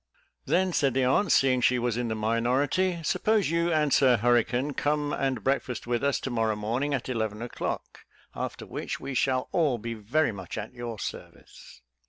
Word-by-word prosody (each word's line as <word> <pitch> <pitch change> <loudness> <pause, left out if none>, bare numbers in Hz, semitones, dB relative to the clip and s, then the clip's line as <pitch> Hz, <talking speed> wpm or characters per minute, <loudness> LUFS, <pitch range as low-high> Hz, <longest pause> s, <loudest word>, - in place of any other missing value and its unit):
"Then," 185 0 +1
said 135 -5 +1
the 135 - +2
aunt, 150 +8 +2
seeing 130 -1 +4
she 125 +1 +3
was 120 -2 0
in 120 0 -1
the 110 - -2
minority, 130 +11 +1
"suppose 205 -1 +1
you 170 +1 +1
and 150 -3 +2
Sir 130 -3 +5
Hurricane 120 +4 +2
come 145 +1 0
and 130 -6 -1
breakfast 135 -2 -1
with 120 +1 -1
us 140 -1 +1
to 135 - -4
morrow 115 -2 +1
morning 120 +8 -1
at 130 - -4
eleven 110 -4 -2
o'clock, 120 - -5 0.3
after - - -5
which, - - -5
we 140 0 -5
shall 130 0 +1
all 150 -8 +2
be 115 +1 -5
very 115 +7 0
much 100 -2 -7
at 105 - -5
your 120 -2 -6
service." 65 - -9
130 Hz, 185 wpm, -27 LUFS, 115-145 Hz, 0.3 s, Sir